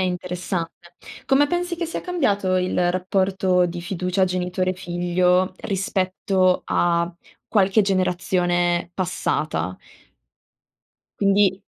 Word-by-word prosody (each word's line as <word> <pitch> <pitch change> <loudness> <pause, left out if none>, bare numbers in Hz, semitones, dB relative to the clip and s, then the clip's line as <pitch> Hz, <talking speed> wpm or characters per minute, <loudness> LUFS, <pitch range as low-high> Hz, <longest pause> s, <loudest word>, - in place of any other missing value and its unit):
interessante. 180 -1 -4 0.3
Come 275 +2 +4
pensi 350 +2 -2
che 340 0 -2
sia 335 - -4
cambiato 205 - 0
il 180 -1 +1
rapporto 185 0 +1
di 175 0 -3
fiducia 180 +1 0
genitore-figlio 180 0 0
rispetto 185 -1 0
a 170 0 +1 0.3
qualche 200 0 +3
generazione 180 -2 0
passata? 155 - -2 1.4
Quindi 195 -1 +3
185 Hz, 85 wpm, -22 LUFS, 175-195 Hz, 1.4 s, Come